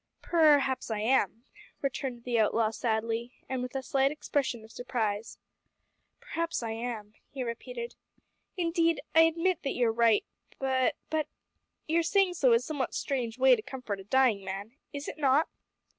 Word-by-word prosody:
"Perhaps 290 -7 +3
I 220 - -1
am," 225 -2 +1 0.4
returned 260 -3 -3
the 240 -2 0
outlaw 220 0 +2
sadly, 230 +1 -1
and 260 -1 -2
with 250 +1 -5
a 265 - -2
slight 270 +1 +2
expression 280 -6 -2
of 220 - -14
surprise. 225 -4 -2 0.8
"Perhaps 335 -5 -3
I 225 - -2
am," 225 -2 -5 0.2
he 270 -3 -4
repeated. 470 - -5 0.6
"Indeed 335 -1 +2
I 325 - +7
admit 335 +2 +1
that 275 - -2
you 240 -2 +3
are - - 0
right, 230 -2 +4 0.3
but 265 +2 +1 0.2
but 310 -1 0 0.6
your 330 +2 +3
saying 370 +2 +3
so 270 -7 +3
is 230 +1 +3
a - - -8
somewhat 285 -5 -2
strange 245 -5 -2
way 260 -1 +6
to 220 - -6
comfort 240 -5 -5
a - - -9
dying 225 -2 +3
man. 195 +5 -6 0.2
Is 285 0 -6
it 310 - -6
not?" 285 +2 +4
260 Hz, 165 wpm, -30 LUFS, 230-300 Hz, 0.8 s, I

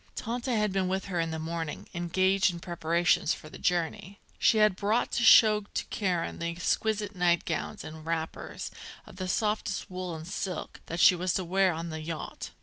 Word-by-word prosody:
Tante 240 +2 -2
had 210 -2 +1
been 190 -1 +1
with 190 +1 -1
her 180 -3 -2
in 165 0 0
the 160 - -3
morning, 160 -1 -4
engaged 185 +2 +2
in 170 - -7
preparations 170 -1 +1
for 155 - -12
the - - -10
journey. 180 +3 -1 0.2
She 225 - +4
had 215 -3 +4
brought 210 +5 0
to 235 - 0
show 215 -2 +7
to - - -1
Karen 180 -5 -1
the 170 - -2
exquisite 205 +4 -1
nightgowns 175 -2 0
and 155 0 -9
wrappers, 160 0 -4 0.3
of 185 -1 -6
softest 210 -1 -1
wool 180 -2 -4
and 160 +1 -8
silk, 185 -2 -4
that 170 - -4
she 180 - +8
was 180 0 -1
to 185 - -1
wear 190 +2 +3
on 165 +1 -4
the 160 0 -5
yacht. 160 0 -6
180 Hz, 185 wpm, -29 LUFS, 165-200 Hz, 0.3 s, she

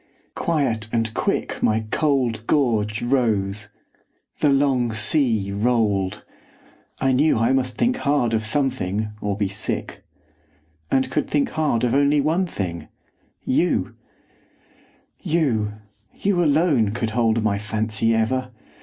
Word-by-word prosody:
Quiet 135 -10 -1
and 115 -1 -1
quick - - -2
My 110 +1 +2
cold 125 -7 0
gorge 110 -7 +1
rose; 105 -5 0 0.7
the 150 - +3
long 135 -4 +2
sea 110 -3 +1
rolled; 105 -3 0 0.7
I 135 - +2
knew 140 +3 +3
I 115 +3 +2
must 130 -1 -1
think 250 +2 +1
hard 140 - +1
of 110 -1 +1
something, 110 -5 -1
or 100 -1 -2
be 105 -2 0
sick; 95 - -3 0.9
And 130 -1 +1
could 150 - -1
think 145 -1 +1
hard 150 -7 0
of 120 -1 +1
only 145 +1 +3
one 165 +6 +1
thing 85 - -5 0.6
YOU! - - +1 1.3
You, 120 -11 0 0.4
you 195 -3 +1
alone 145 - +2
could 115 -1 -2
hold 115 -1 +1
my 100 -2 0
fancy 110 +1 0
ever! 125 +3 0
120 Hz, 125 wpm, -22 LUFS, 110-140 Hz, 1.3 s, the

